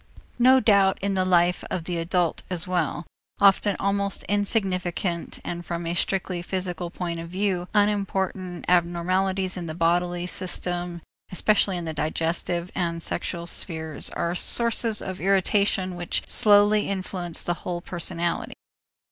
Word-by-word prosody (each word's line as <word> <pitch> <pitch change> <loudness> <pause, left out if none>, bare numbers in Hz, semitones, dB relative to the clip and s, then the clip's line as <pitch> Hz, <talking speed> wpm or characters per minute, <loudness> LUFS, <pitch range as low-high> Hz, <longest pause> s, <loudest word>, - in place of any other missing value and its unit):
No 260 +2 +6
doubt 200 -5 +4
in 200 0 0
the 190 -1 +1
life 180 -1 +2
of 175 - -3
the 170 0 -3
adult 170 0 0
as 180 -1 -2
well, 175 -2 -1 0.3
often 200 0 +4
almost 200 0 0
insignificant 190 -4 0
and 175 0 -4
from 170 0 -4
a 165 - -1
strictly 180 0 -1
physical 180 -1 -3
point 170 -1 -4
of 165 0 -7
view 185 -1 -1
unimportant 195 -3 0
abnormities 185 +2 +1
in 175 -2 -5
the 155 - -5
bodily 175 +1 +1
system, 175 -2 -1 0.3
especially 195 0 +2
in 175 - -4
the 160 - -4
digestive 165 +3 -1
and 170 -2 -2
sexual 170 0 -2
spheres, 160 -3 -2
are 170 0 -2
sources 230 +2 +2
of 190 -1 -6
irritation 195 0 +1
which 175 -1 -2
slowly 210 -1 +5
influence 185 -3 -2
the 175 - 0
whole 175 -1 -3
personality. 175 -1 -2
180 Hz, 140 wpm, -25 LUFS, 170-195 Hz, 0.3 s, No